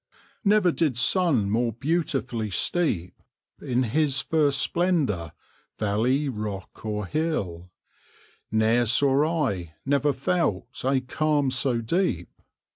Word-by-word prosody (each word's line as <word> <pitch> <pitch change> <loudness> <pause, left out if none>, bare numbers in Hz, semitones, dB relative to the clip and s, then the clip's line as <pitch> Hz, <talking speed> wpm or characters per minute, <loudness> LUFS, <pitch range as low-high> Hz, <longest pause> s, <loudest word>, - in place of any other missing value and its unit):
Never 205 -3 +4
did 150 -7 0
sun 140 - +2
more 115 +1 +1
beautifully 130 -5 -2
steep 100 - -1 0.4
In 125 0 0
his 140 +3 +1
first 145 -1 +2
splendour, 140 - 0 0.4
valley, 115 +8 +1
rock 105 -6 -6
or 105 -2 -3
hill; 95 - -2 0.8
Ne'er 110 +2 +2
saw 140 +4 +3
I, 85 -5 -7
never 145 +1 +2
felt, 140 - -2
a 130 0 +2
calm 145 +1 0
so 130 -2 +1
deep! 115 - -1
130 Hz, 110 wpm, -25 LUFS, 110-155 Hz, 0.8 s, Never